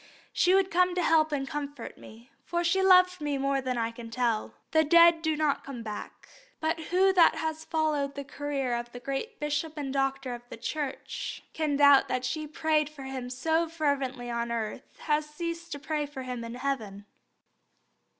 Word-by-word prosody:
she 365 Hz, +1 st, +4 dB
would 385 Hz, -1 st, +2 dB
come 360 Hz, +1 st, +3 dB
to 360 Hz, -, +1 dB
help 315 Hz, -1 st, +4 dB
and 275 Hz, -2 st, -1 dB
comfort 285 Hz, -1 st, -5 dB
me, 230 Hz, +4 st, -15 dB
for 345 Hz, 0 st, -1 dB
she 380 Hz, +3 st, +2 dB
loved 365 Hz, -2 st, +5 dB
me 290 Hz, -1 st, -1 dB
more 275 Hz, 0 st, 0 dB
than 255 Hz, -1 st, -2 dB
I 230 Hz, 0 st, 0 dB
can 230 Hz, 0 st, -9 dB
tell." 230 Hz, -2 st, -1 dB, 0.2 s
The 315 Hz, 0 st, +4 dB
dead 335 Hz, +1 st, +6 dB
do 315 Hz, -2 st, 0 dB
not 300 Hz, -2 st, +1 dB
come 250 Hz, -4 st, -7 dB
back. 210 Hz, -2 st, -7 dB, 0.3 s
But 320 Hz, +1 st, 0 dB
who 380 Hz, +3 st, +3 dB
that 345 Hz, -3 st, +6 dB
has 315 Hz, 0 st, -3 dB
followed 300 Hz, -3 st, 0 dB
the 280 Hz, -, -4 dB
career 275 Hz, -2 st, -3 dB
of 240 Hz, 0 st, -3 dB
the 245 Hz, -, -7 dB
great 275 Hz, -, -4 dB
bishop 295 Hz, +1 st, -2 dB
and 275 Hz, -2 st, -3 dB
doctor 270 Hz, -1 st, -1 dB
of 240 Hz, -, -7 dB
the -, -, -8 dB
Church 285 Hz, +4 st, -4 dB
can 305 Hz, -2 st, 0 dB
doubt 285 Hz, -1 st, +6 dB
that 255 Hz, 0 st, -1 dB
she 310 Hz, +2 st, -2 dB
who -, -, -9 dB
prayed 305 Hz, -1 st, +1 dB
for 300 Hz, -3 st, -11 dB
him 265 Hz, -2 st, -5 dB
so 320 Hz, +6 st, 0 dB
fervently 275 Hz, -6 st, -1 dB
on 235 Hz, 0 st, -2 dB
earth 225 Hz, -2 st, -5 dB
had 300 Hz, 0 st, +1 dB
ceased 335 Hz, +2 st, -6 dB
to -, -, -4 dB
pray 295 Hz, +1 st, -2 dB
for 270 Hz, -2 st, -7 dB
him 250 Hz, -2 st, -5 dB
in 230 Hz, +1 st, -6 dB
heaven? 225 Hz, -7 st, -3 dB
290 Hz, 195 wpm, -28 LUFS, 255-320 Hz, 0.3 s, dead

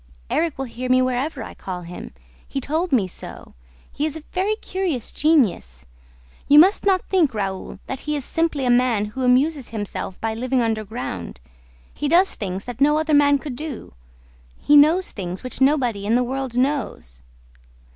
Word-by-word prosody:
"Erik 330 Hz, -3 st, 0 dB
will 270 Hz, -, -3 dB
hear 250 Hz, +1 st, -6 dB
me 255 Hz, 0 st, +5 dB
wherever 255 Hz, +2 st, -1 dB
I -, -, -9 dB
call 180 Hz, -2 st, -6 dB
him. 175 Hz, +1 st, -9 dB, 0.4 s
He 275 Hz, -, -3 dB
told 320 Hz, +7 st, -1 dB
me 225 Hz, -8 st, +3 dB
so. -, -, -10 dB, 0.4 s
He 290 Hz, -, -4 dB
is 310 Hz, -, -5 dB
a 320 Hz, -, -8 dB
very 390 Hz, +4 st, 0 dB
curious 370 Hz, -, -3 dB
genius. 195 Hz, -, +1 dB, 0.6 s
You 290 Hz, -, +6 dB
must 380 Hz, +6 st, +6 dB
not 375 Hz, -2 st, +2 dB
think, 325 Hz, -11 st, +2 dB
Raoul, 195 Hz, -1 st, -4 dB
that 265 Hz, -, -5 dB
he 300 Hz, +1 st, -3 dB
is 280 Hz, -4 st, -4 dB
simply 325 Hz, -5 st, -1 dB
a 245 Hz, -, +3 dB
man 240 Hz, -4 st, +2 dB
who 265 Hz, -, -4 dB
amuses 260 Hz, +2 st, +2 dB
himself 205 Hz, -3 st, -5 dB
by 225 Hz, 0 st, -2 dB
living 250 Hz, +2 st, 0 dB
underground. 215 Hz, -, -4 dB, 0.5 s
He 295 Hz, -, -3 dB
does 355 Hz, +6 st, +4 dB
things 195 Hz, -1 st, -5 dB
that 245 Hz, +1 st, -8 dB
no 295 Hz, +2 st, +4 dB
other 310 Hz, 0 st, 0 dB
man 285 Hz, 0 st, +5 dB
could 280 Hz, -2 st, -7 dB
do; 285 Hz, -, -7 dB, 0.6 s
he 295 Hz, -, +3 dB
knows 315 Hz, +6 st, +5 dB
things 180 Hz, -2 st, -6 dB
which 255 Hz, +1 st, -4 dB
nobody 250 Hz, -8 st, +2 dB
in 225 Hz, -, +3 dB
the 250 Hz, -, +3 dB
world 260 Hz, -1 st, -4 dB
knows." 245 Hz, -, -2 dB
255 Hz, 175 wpm, -22 LUFS, 220-300 Hz, 0.6 s, You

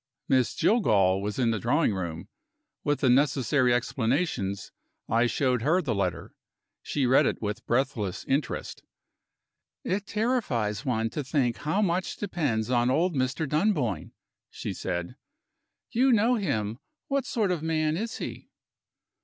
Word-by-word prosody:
Miss 130 Hz, -3 st, +2 dB
Jillgall 100 Hz, -, +3 dB
was 105 Hz, 0 st, -3 dB
in 120 Hz, -3 st, +2 dB
the 110 Hz, -, -1 dB
drawing 125 Hz, -, +2 dB
room. 85 Hz, -4 st, -4 dB, 0.6 s
With 145 Hz, 0 st, 0 dB
the 135 Hz, -, +3 dB
necessary 130 Hz, -1 st, +3 dB
explanations, 120 Hz, -, -1 dB, 0.4 s
I 115 Hz, +2 st, +3 dB
showed 125 Hz, -1 st, +1 dB
her 160 Hz, +9 st, +3 dB
the 140 Hz, -10 st, -1 dB
letter. 95 Hz, -4 st, -2 dB, 0.5 s
She 140 Hz, -3 st, -1 dB
read 130 Hz, +2 st, +5 dB
it -, -, -1 dB
with 105 Hz, -1 st, -4 dB
breathless 115 Hz, -7 st, -1 dB
interest. 135 Hz, -1 st, -2 dB, 1.0 s
"It 200 Hz, +3 st, -2 dB
terrifies 205 Hz, -, 0 dB
one 115 Hz, -2 st, 0 dB
to 150 Hz, -, -3 dB
think 130 Hz, -3 st, 0 dB
how 185 Hz, +8 st, 0 dB
much 180 Hz, -1 st, 0 dB
depends 140 Hz, -, -1 dB
on 120 Hz, 0 st, +3 dB
old 170 Hz, +7 st, +2 dB
Mr. 130 Hz, +4 st, 0 dB
Dunboyne," 150 Hz, -, 0 dB, 0.4 s
she -, -, -5 dB
said. 85 Hz, -1 st, -4 dB, 0.7 s
"You 255 Hz, +3 st, +3 dB
know 230 Hz, +2 st, +4 dB
him. 115 Hz, -, -1 dB, 0.3 s
What 275 Hz, -2 st, -1 dB
sort 210 Hz, -5 st, 0 dB
of 175 Hz, -4 st, -1 dB
man 155 Hz, -1 st, 0 dB
is 220 Hz, +6 st, -3 dB
he?" -, -, -7 dB
130 Hz, 140 wpm, -27 LUFS, 110-170 Hz, 1.0 s, read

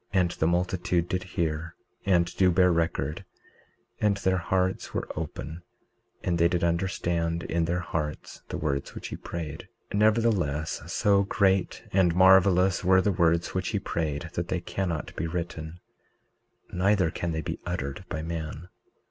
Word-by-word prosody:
19:33 -, -, +6 dB
And 90 Hz, -1 st, 0 dB
the 80 Hz, -, 0 dB
multitude 90 Hz, 0 st, 0 dB
did 90 Hz, 0 st, -1 dB
hear 80 Hz, -2 st, -3 dB, 0.3 s
and 85 Hz, -3 st, +2 dB
do 95 Hz, -1 st, +4 dB
bear 90 Hz, 0 st, +4 dB
record; 80 Hz, -3 st, -1 dB, 0.8 s
and 105 Hz, -1 st, +2 dB
their 95 Hz, -2 st, +1 dB
hearts 95 Hz, +1 st, -1 dB
were -, -, -2 dB
open 80 Hz, +1 st, -5 dB, 0.6 s
and 85 Hz, -1 st, 0 dB
they 85 Hz, -, +6 dB
did 85 Hz, 0 st, -1 dB
understand 85 Hz, -1 st, 0 dB
in 85 Hz, 0 st, 0 dB
their 85 Hz, +2 st, -1 dB
hearts 75 Hz, -3 st, -4 dB
the -, -, -3 dB
words 70 Hz, -3 st, -2 dB
which -, -, -6 dB
he -, -, -5 dB
prayed. 80 Hz, -4 st, -6 dB, 0.2 s
19:34 100 Hz, -, 0 dB
Nevertheless, 105 Hz, -9 st, +2 dB
so 100 Hz, -1 st, +3 dB
great 95 Hz, -1 st, +1 dB
and 90 Hz, -3 st, +3 dB
marvelous 95 Hz, 0 st, +5 dB
were 95 Hz, +1 st, +5 dB
the 105 Hz, -, +2 dB
words 85 Hz, -2 st, +2 dB
which 95 Hz, 0 st, -1 dB
he 100 Hz, -, 0 dB
prayed 80 Hz, -3 st, -3 dB
that 85 Hz, 0 st, -2 dB
they 90 Hz, -, -1 dB
cannot 85 Hz, -3 st, -3 dB
be 85 Hz, -, -2 dB
written, 85 Hz, -1 st, -5 dB, 0.9 s
neither 95 Hz, -2 st, +2 dB
can 85 Hz, +1 st, -3 dB
they 80 Hz, 0 st, -2 dB
be -, -, -4 dB
uttered 70 Hz, -3 st, -3 dB
by 80 Hz, -1 st, -3 dB
man. 80 Hz, +1 st, -5 dB
85 Hz, 160 wpm, -27 LUFS, 80-95 Hz, 0.9 s, 19:33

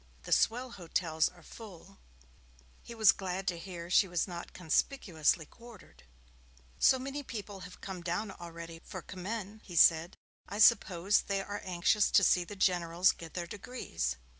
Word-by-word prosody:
The -, -, -9 dB
swell 245 Hz, +2 st, +2 dB
hotels 165 Hz, -4 st, 0 dB
are 175 Hz, -2 st, -19 dB
full.' 195 Hz, -2 st, -13 dB, 0.8 s
He 235 Hz, -, -10 dB
was 220 Hz, -3 st, +7 dB
glad 190 Hz, 0 st, -5 dB
to 170 Hz, -2 st, -4 dB
hear 170 Hz, -2 st, -7 dB
she 195 Hz, -, +5 dB
was 175 Hz, 0 st, -1 dB
not 175 Hz, -2 st, -7 dB
conspicuously 165 Hz, -, 0 dB
quartered. 235 Hz, +2 st, -16 dB, 0.7 s
'So 260 Hz, -, +5 dB
many 275 Hz, +3 st, -5 dB
people 210 Hz, -6 st, -7 dB
have 180 Hz, -1 st, -11 dB
come 190 Hz, -2 st, -6 dB
down 190 Hz, +5 st, -2 dB
already 170 Hz, -1 st, -9 dB
for 185 Hz, -, -8 dB
Commem,' 205 Hz, +3 st, -6 dB
he 175 Hz, -, -10 dB
said. 165 Hz, +2 st, +5 dB, 0.3 s
'I 205 Hz, -, -5 dB
suppose 200 Hz, -3 st, +4 dB
they 195 Hz, -1 st, -2 dB
are 205 Hz, +1 st, -6 dB
anxious 185 Hz, +3 st, +2 dB
to 200 Hz, -, +5 dB
see 180 Hz, -1 st, +4 dB
the 190 Hz, +4 st, -9 dB
Generals 180 Hz, -1 st, +3 dB
get 165 Hz, -1 st, -11 dB
their 175 Hz, -1 st, -3 dB
degrees. 180 Hz, -, -4 dB
185 Hz, 160 wpm, -31 LUFS, 170-205 Hz, 0.8 s, was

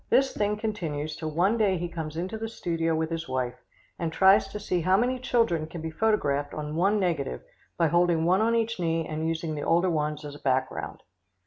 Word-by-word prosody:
This 270 Hz, 0 st, +3 dB
thing 210 Hz, 0 st, 0 dB
continues, 160 Hz, -9 st, -3 dB
till 155 Hz, 0 st, -4 dB
one 185 Hz, +9 st, +2 dB
day 195 Hz, -4 st, +3 dB
he 175 Hz, +1 st, -3 dB
comes 160 Hz, -2 st, -6 dB
into 185 Hz, +5 st, -3 dB
the 225 Hz, +1 st, -4 dB
studio 165 Hz, -6 st, -1 dB
with 160 Hz, +1 st, -1 dB
his 165 Hz, -3 st, -4 dB
wife, 130 Hz, -1 st, -1 dB, 0.5 s
and 165 Hz, -2 st, -1 dB
tries 190 Hz, +3 st, +5 dB
to 205 Hz, +2 st, -6 dB
see 180 Hz, -3 st, -1 dB
how 185 Hz, +3 st, +3 dB
many 250 Hz, +3 st, +1 dB
children 230 Hz, -11 st, +1 dB
can 170 Hz, +1 st, -8 dB
be 160 Hz, 0 st, -4 dB
photographed 145 Hz, -8 st, 0 dB
on 150 Hz, 0 st, -4 dB
one 200 Hz, +5 st, +2 dB
negative 165 Hz, -, -1 dB, 0.3 s
by 165 Hz, -, +3 dB
holding 170 Hz, -1 st, +3 dB
one 185 Hz, +4 st, +3 dB
on 230 Hz, +1 st, +2 dB
each 230 Hz, -2 st, 0 dB
knee 165 Hz, -2 st, 0 dB
and 155 Hz, +1 st, -2 dB
using 165 Hz, -1 st, -2 dB
the 150 Hz, -, -4 dB
older 175 Hz, +4 st, +2 dB
ones 150 Hz, -1 st, -2 dB
as 145 Hz, -, -7 dB
a 145 Hz, -, -11 dB
back 130 Hz, -1 st, +1 dB
ground. -, -, -7 dB
170 Hz, 220 wpm, -27 LUFS, 155-200 Hz, 0.5 s, tries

